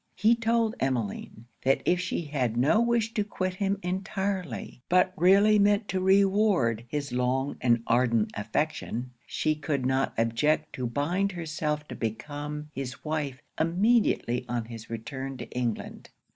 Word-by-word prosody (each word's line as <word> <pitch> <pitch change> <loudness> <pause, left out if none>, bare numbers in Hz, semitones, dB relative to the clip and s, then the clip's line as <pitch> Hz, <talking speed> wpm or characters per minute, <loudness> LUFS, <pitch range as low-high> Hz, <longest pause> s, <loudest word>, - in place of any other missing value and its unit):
He 220 +5 +4
told 230 -1 +1
Emmeline, 120 -3 -2 0.2
that 135 +1 +2
if 180 - +3
she 175 -1 -2
had 130 -6 -1
no 145 - +4
wish 235 -1 +1
to 210 - +1
quit 185 -2 -3
him 200 +1 0
entirely, 185 - -3
but 185 +1 +4
really 200 +4 +5
meant 205 +1 +3
to 190 - 0
reward 190 - +3
his 145 +1 -3
long 125 +2 0
and 120 -2 +3
ardent 115 -2 +2
affection, 125 +2 -2 0.2
she 155 - 0
could 145 -3 -2
not 130 +1 +1
object 115 +7 +1
to 125 -2 -2
bind 175 +10 0
herself 155 -3 -3
to - - -6
become 145 +6 -5
his 135 +1 -6
wife 150 -3 -3 0.2
immediately 175 - +2
on 120 -2 -1
his 115 -1 -9
return 130 +4 -5
to 120 -2 -7
England. 120 -3 -3
150 Hz, 145 wpm, -28 LUFS, 125-190 Hz, 0.2 s, really